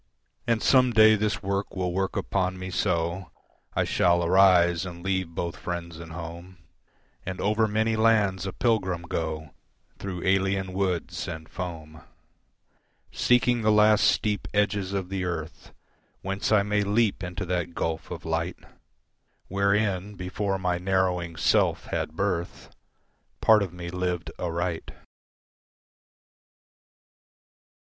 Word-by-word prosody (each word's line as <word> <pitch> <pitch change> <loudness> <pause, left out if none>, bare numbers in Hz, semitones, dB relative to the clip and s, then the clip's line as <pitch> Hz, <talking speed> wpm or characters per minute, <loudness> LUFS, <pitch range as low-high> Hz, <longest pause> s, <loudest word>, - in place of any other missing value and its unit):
And 115 -2 +1
some 125 -2 +4
day 110 0 +7
this 105 0 -1
work 100 +1 -2
will 90 -2 -1
work 95 +1 -1
upon 95 -1 -1
me 95 0 -6
so 90 -1 -1 0.5
I - - +2
shall 85 0 +2
arise 85 -2 +5
and 85 -2 -8
leave 95 -3 -1
both 85 -1 -3
friends 85 -2 -5
and 85 -1 -9
home 85 +2 -8 0.7
And 95 0 -5
over 110 +2 +2
many 110 +1 +1
lands 105 -4 +2
a - - -3
pilgrim 95 -8 0
go 80 -2 -4 0.5
Through 95 -3 -5
alien 95 0 +1
woods 95 -3 -2
and 80 -2 -6
foam, 80 -3 -7 1.1
Seeking 125 -1 +2
the 110 0 +3
last 105 0 +5
steep 105 -1 +1
edges 100 -2 +1
of 95 -2 -3
the 95 -1 -2
earth 80 -3 -5 0.5
Whence 95 +2 -2
I 105 -2 +5
may 105 0 +1
leap 105 +1 +1
into 90 0 -4
that 90 -1 -2
gulf 80 -1 -3
of 85 -1 -7
light 80 +2 -2 0.9
Wherein, 100 0 0
before 95 +1 -2
my 90 -2 -1
narrowing 90 -2 0
Self - - +2
had 75 - -2
birth, 90 -2 -3 0.7
Part 110 -1 +5
of 95 -4 -2
me 85 -1 -7
lived 90 -1 -2
aright. 85 -1 -2
95 Hz, 130 wpm, -26 LUFS, 85-100 Hz, 1.1 s, day